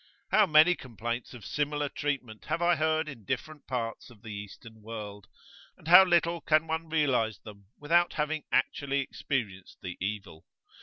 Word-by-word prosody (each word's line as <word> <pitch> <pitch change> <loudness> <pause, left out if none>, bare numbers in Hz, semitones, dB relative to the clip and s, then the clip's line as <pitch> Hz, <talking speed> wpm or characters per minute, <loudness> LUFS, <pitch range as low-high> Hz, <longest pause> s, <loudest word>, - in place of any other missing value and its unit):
How 215 -2 +5
many 155 +3 +6
complaints 120 - -5
of 110 -5 -11
similar 150 0 -1
treatment 135 -7 -4
have - - -1
I 175 0 +3
heard 155 0 +1
in 130 -7 -9
different 140 +7 -5
parts 115 -3 -4
of 115 -3 -18
the 110 -2 -7
Eastern 105 +2 -10
world! 105 -3 -8 0.5
and - - -15
how 180 +3 +10
little 170 -2 +2
can 155 0 +3
one 160 0 -3
realise 130 -9 +1
them 100 0 -14
without 170 +4 +2
having 150 0 -2
actually 140 +1 +1
experienced 110 -9 -4
the 90 -2 -6
evil! 100 -5 -5
135 Hz, 160 wpm, -29 LUFS, 110-155 Hz, 0.5 s, how